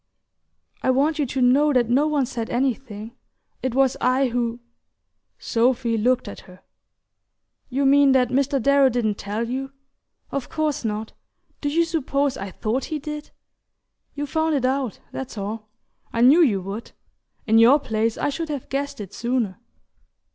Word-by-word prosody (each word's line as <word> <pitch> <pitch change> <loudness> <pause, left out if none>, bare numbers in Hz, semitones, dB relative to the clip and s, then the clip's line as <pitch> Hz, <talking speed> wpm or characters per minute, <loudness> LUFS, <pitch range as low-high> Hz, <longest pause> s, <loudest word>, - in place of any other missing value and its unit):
"I - - 0
want 290 +4 +2
you 285 - +1
to 260 +2 -2
know 280 +5 +4
that 245 -3 +3
no 270 +6 +3
one 295 -3 +1
said 235 -3 -5
anything... 240 -3 -2 0.5
It 260 -2 -2
was 270 -1 +3
I 255 +1 +2
who..." 235 0 -2 0.8
Sophy 235 0 +1
looked 245 +2 +1
at 205 - -7
her. 185 0 -16 1.1
"You 275 +2 0
mean 280 0 +5
that 250 -2 +3
Mr. 275 +2 +1
Darrow 280 +1 +4
didn't 225 -4 -1
tell 210 +3 -3
you? 270 +2 -4 0.6
Of 275 -2 -3
course 300 -2 -1
not: 215 0 -3 0.5
do 290 - 0
you 335 +3 +2
suppose 285 -4 0
I 195 -4 -6
thought 225 +7 -2
he 310 - -3
did? 300 +1 -7 0.9
You 290 0 -3
found 315 +2 0
it 265 -3 0
out, 260 -3 -1
that's 265 -4 -6
all 215 +2 -5 0.4
I 230 - -1
knew 275 +8 +7
you 215 - +3
would. 200 +4 -7 0.5
In 225 0 +4
your 250 +6 +7
place 225 -3 -1
I - - 0
should 320 +3 -4
have 285 -4 -5
guessed 280 -1 -3
it 200 -1 -8
sooner." 235 -6 -2
255 Hz, 160 wpm, -23 LUFS, 230-280 Hz, 1.1 s, knew